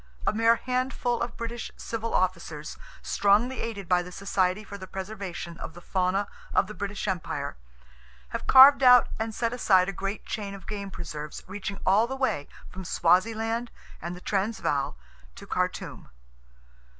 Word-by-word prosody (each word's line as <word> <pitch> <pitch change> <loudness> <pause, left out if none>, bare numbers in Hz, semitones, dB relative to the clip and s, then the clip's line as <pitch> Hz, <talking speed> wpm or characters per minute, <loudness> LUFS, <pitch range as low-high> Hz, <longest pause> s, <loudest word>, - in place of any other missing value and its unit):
A - - +2
mere 225 +1 +4
handful 250 -1 -1
of 235 0 -3
British 235 0 -5
civil 230 0 -4
officers, 170 -5 -1 0.3
strongly 215 +6 +2
aided 200 -5 -5
by 180 0 +3
the 180 +1 -8
Society 190 +1 0
for 200 - -9
the 190 -1 -8
Preservation 190 -3 -6
of 160 - -7
the - - -9
Fauna 185 +2 0 0.3
of - - +5
the 215 - -8
British 200 +2 -4
Empire, 185 - -3 0.7
have - - -5
carved 270 +1 +9
out 250 -1 +7
and 220 -1 -3
set 230 0 0
aside 190 -7 +4
a 195 - -2
great 195 +2 -4
chain 200 -2 -4
of 190 - -12
game 200 -2 -5
preserves 150 -5 -7
reaching 195 0 -5
all 205 +5 +4
the 265 - -4
way 260 - 0 0.2
from 190 +1 -8
Swaziland 225 +8 +1 0.3
and 170 +2 -5
the 180 - -11
Transvaal 195 - -1 0.4
to - - -11
Khartoum. - - -3
200 Hz, 160 wpm, -27 LUFS, 185-230 Hz, 0.7 s, carved